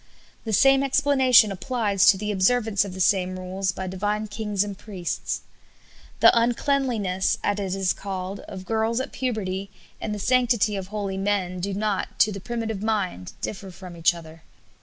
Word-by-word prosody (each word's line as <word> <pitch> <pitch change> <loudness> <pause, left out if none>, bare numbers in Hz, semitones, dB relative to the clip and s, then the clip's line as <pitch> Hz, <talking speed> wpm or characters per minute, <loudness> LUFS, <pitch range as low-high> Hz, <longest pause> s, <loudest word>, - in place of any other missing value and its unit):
The 220 - -2
same 270 +6 +5
explanation 265 -5 +4
applies 200 0 +1
to 200 -1 +7
the 210 +2 -3
observance 205 +1 +2
of 195 -2 -7
the - - -7
same 185 -1 +2
rules 185 +1 -2
by 190 - -6
divine 205 +3 -2
kings 210 -1 -1
and 205 -1 -6
priests. 185 -3 -4 0.8
The - - +7
uncleanliness, 235 -5 +1
as 205 0 0
it 190 -2 -2
is 190 -1 +2
called, 195 0 -5
of 190 -1 -8
girls 225 +2 0
at 260 - -4
puberty 200 -6 -3 0.3
and 215 - -3
the 210 - -3
sanctity 235 -2 +2
of 190 -1 -4
holy 200 -2 -4
men 195 -2 -1
do 195 +2 -3
not, 205 -1 -2
to 210 0 +5
the 200 -1 -6
primitive 225 -2 -4
mind, 200 - -2
differ 195 -1 -5
from 180 -1 -10
each 170 +1 +3
other. 165 -1 -12
200 Hz, 170 wpm, -24 LUFS, 185-225 Hz, 0.8 s, to